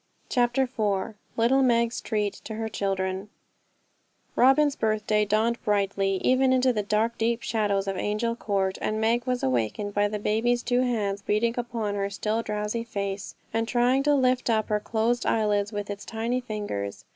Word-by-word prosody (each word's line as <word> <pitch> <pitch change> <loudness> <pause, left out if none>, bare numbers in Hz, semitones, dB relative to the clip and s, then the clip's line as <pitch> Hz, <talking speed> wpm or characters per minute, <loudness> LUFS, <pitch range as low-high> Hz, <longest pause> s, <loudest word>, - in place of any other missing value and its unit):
CHAPTER 245 +1 +2
IV 220 -4 -1 0.2
Little 245 +4 +4
Meg's 235 -2 +2
Treat 210 -2 -1
to 220 - -5
Her 220 0 -3
Children 190 -1 -2 1.1
Robin's 275 +3 +4
birthday 215 -1 +1
dawned 220 +3 +1
brightly, 200 -2 +1
even 260 +1 +4
into 255 0 +3
the 210 - 0
dark 215 +3 0
deep 230 +1 0
shadows 205 -3 0
of 195 - -1
Angel 215 +4 -1
Court, 195 -4 -1
and 215 0 -1
Meg 230 +2 +1
was 250 -1 -1
awakened 130 - -1
by 205 0 +2
the 210 +1 -3
baby's 225 +4 +1
two 245 0 +2
hands 210 -5 -1
beating 215 +3 +1
upon 230 -4 -2
her 200 -1 -1
still 215 +3 -1
drowsy 210 +1 -2
face, 200 -3 -4 0.2
and 225 0 0
trying 245 +2 +3
to 290 +1 +3
lift 255 -2 +2
up 220 -1 +1
her 210 -1 +2
closed 230 +3 0
eyelids 210 -1 +1
with 205 -1 -4
its 200 0 -6
tiny 230 +3 -2
fingers. 205 - -5
220 Hz, 170 wpm, -26 LUFS, 205-240 Hz, 1.1 s, Little